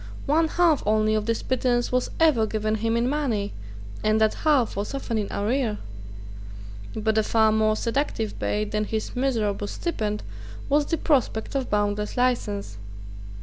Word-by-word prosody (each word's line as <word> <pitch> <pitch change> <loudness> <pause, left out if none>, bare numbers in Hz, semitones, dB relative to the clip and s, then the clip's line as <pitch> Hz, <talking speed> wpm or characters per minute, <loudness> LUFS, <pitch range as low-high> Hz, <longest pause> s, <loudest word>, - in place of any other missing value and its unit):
One 320 +3 +3
half 330 -2 +3
only 215 0 +3
of 215 0 0
this 230 -1 -1
pittance 245 -1 0
was 250 0 +1
ever 290 -9 +4
given 215 0 -1
him 225 +1 0
in 235 +1 +1
money; 255 -8 -1 0.5
and 215 +1 +3
that 220 -1 +3
half 290 -7 +2
was 205 +7 -3
often 235 -5 -2
in 205 - -3
arrear. 220 +1 0 1.2
But 220 0 +1
a - - +4
far 220 0 +3
more 215 0 +2
seductive 230 -2 -2
bait 210 0 -1
than 210 0 0
his 220 0 -4
miserable 220 -6 0
stipend 210 - -3 0.5
was 290 +1 +3
the 330 - 0
prospect 260 -9 0
of 270 -2 -2
boundless 210 +2 -1
license. 210 - -1
220 Hz, 155 wpm, -25 LUFS, 215-260 Hz, 1.2 s, ever